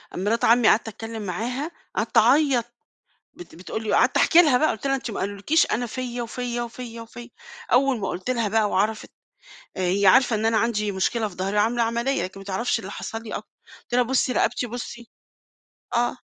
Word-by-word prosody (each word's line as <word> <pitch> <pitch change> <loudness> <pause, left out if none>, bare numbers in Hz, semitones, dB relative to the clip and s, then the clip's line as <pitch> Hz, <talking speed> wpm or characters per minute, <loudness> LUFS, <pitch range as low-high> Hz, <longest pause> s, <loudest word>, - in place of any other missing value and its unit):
مرات 210 +5 0
عمي 235 0 +5
قعدت 225 - +4
أتكلم 225 +1 -7
معاها، 245 - -3 0.2
قعدت 225 +2 -1
أعيط 250 +1 +4 0.7
بت 355 - -13
بتقول 185 +6 -6
لي 215 - -4
وقعدت - - +3
أحكي 345 -1 +6
لها 295 -7 +4
بقى 310 +4 +2
قُلت 250 - -4
لها: 270 - +2
"أنت 255 -3 -5
ما - - -5
قالوا 200 +1 -3
لكيش، 300 +12 +3
أنا 245 +2 0
فيَّ 245 0 -5
وفيَّ 240 +1 -4
وفيَّ 235 0 -7
وفيَّ." 235 +2 -10 0.4
أول 255 0 +3
ما 195 - -3
قُلت 185 +7 -5
لها 235 -3 0
بقى 215 0 +1
وعرفِت، 215 +3 -1 0.7
آآ - - -2
هي 190 +2 +2
عارفة 250 +3 +5
إن 215 +1 -1
أنا 225 0 +3
عندي 210 -3 0
مشكلة 215 +4 0
في 190 - -12
ضهري 195 +3 -2
وعاملة 230 +3 +2
عملية، 235 +4 -1
لكن 190 +2 -7
ما - - -10
تعرفش 200 +5 -1
اللي 195 -2 -8
حصل 225 +2 -6
لي 220 - -8
أ - - 0
قُلت - - -16
لها: 250 0 +4
"بُصي 255 +1 +1
رقبتي 245 0 0
بُصي." 235 0 -7 0.9
آه، 240 +1 +1
230 Hz, 200 wpm, -24 LUFS, 210-245 Hz, 0.9 s, أحكي